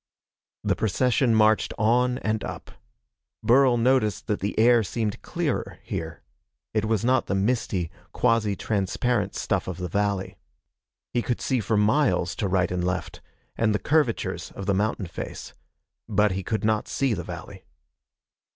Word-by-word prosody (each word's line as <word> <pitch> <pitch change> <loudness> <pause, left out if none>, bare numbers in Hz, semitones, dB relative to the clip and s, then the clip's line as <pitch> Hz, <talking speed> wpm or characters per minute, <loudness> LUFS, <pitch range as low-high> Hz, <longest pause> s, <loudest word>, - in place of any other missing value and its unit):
The - - +1
procession 120 +2 +2
marched 110 0 +3
on 125 +3 +2
and 110 -3 -1
up. - - -7 0.7
Burl 125 0 +5
noticed 120 -3 +2
that 105 -2 -1
the 100 +2 -3
air 120 +1 +6
seemed 105 +1 -3
clearer, - - -2
here. 80 0 -5 0.5
It 110 -1 +1
was 110 0 0
not 130 +1 +2
the 95 - 0
misty, 95 -5 0 0.2
quasi 115 -4 +2
transparent 110 +5 -1
stuff - - -1
of 95 -2 -4
the 90 -1 -3
valley. 100 +1 -1 0.8
He 120 - +2
could 120 0 -2
see 130 -2 0
for 110 0 0
miles 105 - +2
to 105 - 0
right 90 -1 +1
and 90 -1 -1
left, 90 +1 -3 0.3
and 110 -2 +1
the - - +3
curvatures 145 - 0
of 100 - -6
the 100 - +2
mountain 105 +1 0
face. 85 - -7 0.6
But 105 0 +3
he 95 +1 -2
could 110 +3 -2
not 110 -1 +1
see 135 -4 0
the - - -3
valley. - - -9
110 Hz, 155 wpm, -25 LUFS, 100-120 Hz, 0.8 s, air